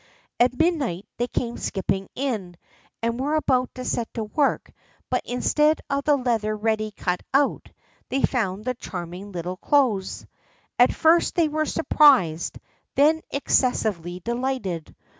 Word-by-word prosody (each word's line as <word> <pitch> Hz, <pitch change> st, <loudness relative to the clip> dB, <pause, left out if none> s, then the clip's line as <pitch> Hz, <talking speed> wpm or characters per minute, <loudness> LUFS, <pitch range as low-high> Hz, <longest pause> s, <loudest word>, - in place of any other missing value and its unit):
At 250 Hz, +1 st, +3 dB
midnight 280 Hz, -, 0 dB
they 240 Hz, -, 0 dB
came 235 Hz, -1 st, -3 dB
skipping 195 Hz, 0 st, -2 dB
in, 215 Hz, -10 st, -3 dB, 0.5 s
and 230 Hz, +1 st, -1 dB
were 290 Hz, +4 st, 0 dB
about 255 Hz, -5 st, +1 dB
to 255 Hz, -, -6 dB
set 235 Hz, -2 st, -2 dB
to 225 Hz, -, -2 dB
work; 275 Hz, +7 st, 0 dB, 0.4 s
but, -, -, +1 dB
instead 300 Hz, +5 st, +2 dB
of 280 Hz, 0 st, -1 dB
the 295 Hz, -, +5 dB
leather 225 Hz, -4 st, 0 dB
ready 215 Hz, 0 st, 0 dB
cut 180 Hz, -3 st, -2 dB
out, 280 Hz, 0 st, +1 dB, 0.4 s
they 270 Hz, -, -1 dB
found 210 Hz, -4 st, 0 dB
the 255 Hz, -, 0 dB
charming 185 Hz, -3 st, -7 dB
little 180 Hz, 0 st, -4 dB
clothes. 235 Hz, -7 st, +1 dB, 0.5 s
At 245 Hz, -, +6 dB
first 330 Hz, +2 st, +3 dB
they 335 Hz, -2 st, +3 dB
were 310 Hz, 0 st, -1 dB
surprised, 250 Hz, -, +3 dB, 0.4 s
then 310 Hz, +3 st, +4 dB
excessively 205 Hz, -10 st, 0 dB
delighted. 235 Hz, -8 st, -3 dB
240 Hz, 140 wpm, -24 LUFS, 195-280 Hz, 0.5 s, At